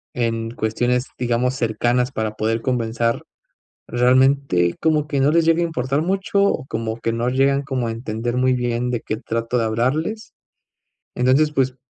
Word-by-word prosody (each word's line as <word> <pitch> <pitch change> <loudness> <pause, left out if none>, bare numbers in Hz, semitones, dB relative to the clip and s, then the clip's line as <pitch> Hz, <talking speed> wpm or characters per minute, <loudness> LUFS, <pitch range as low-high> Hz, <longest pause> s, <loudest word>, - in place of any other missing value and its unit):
en 115 -1 -1
cuestiones, 120 +3 -1
digamos, 125 +1 0
cercanas 120 +2 0
para 110 -2 -2
poder 110 +1 -1
conversar, 115 -2 -1 0.6
realmente, 125 -7 +3
como 155 -2 +2
que 140 -3 -1
no 140 +2 +4
les 165 +1 +3
llegue 165 +1 +3
a - - +2
importar 140 -2 -1
mucho, 195 +2 0
o 200 -9 +1
como 115 -3 -3
que 115 0 -1
no 115 +1 -1
llegan 135 +2 +2
como 130 -4 -2
a 115 - -2
entender 115 +1 -3
muy 130 0 +3
bien, 120 0 -1
de 120 - -1
qué 110 - -4
trato 115 +3 -2
de 115 - +1
hablarles. 145 - -1 0.8
Entonces, 135 +5 +3
pues, 130 -2 0
125 Hz, 165 wpm, -21 LUFS, 115-140 Hz, 0.8 s, no